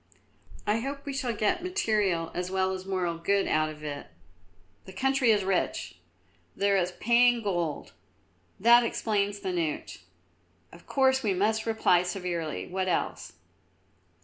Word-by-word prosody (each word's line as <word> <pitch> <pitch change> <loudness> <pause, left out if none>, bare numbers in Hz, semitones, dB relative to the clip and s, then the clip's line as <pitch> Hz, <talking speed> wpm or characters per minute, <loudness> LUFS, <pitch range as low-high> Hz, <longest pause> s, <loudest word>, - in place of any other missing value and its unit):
"I 210 +2 +1
hope 280 +3 -5
we 280 - -4
shall 265 -3 -1
get 210 +6 +1
material 210 - 0
as 180 0 -3
well 190 0 0
as 190 0 -6
moral 180 -3 -1
good 200 +4 +1
out 155 0 +1
of 155 0 -10
it. 145 -1 -6 0.8
The 190 - -11
country 265 +4 +1
is 210 -3 +4
rich; 190 -1 -2 0.6
there 200 0 +2
is 180 -1 0
paying 240 +1 +3
gold; 175 -7 -2 0.7
that 235 +3 +6
explains 205 -3 -1
the 190 -2 -3
note. 165 -4 -3 0.7
Of 170 - -16
course 265 -1 +3
we 205 -5 0
must 220 +4 0
reply 220 -5 +3
severely. 180 -3 -3
What 190 +1 -3
else?" 180 - -2
195 Hz, 145 wpm, -28 LUFS, 180-230 Hz, 0.8 s, that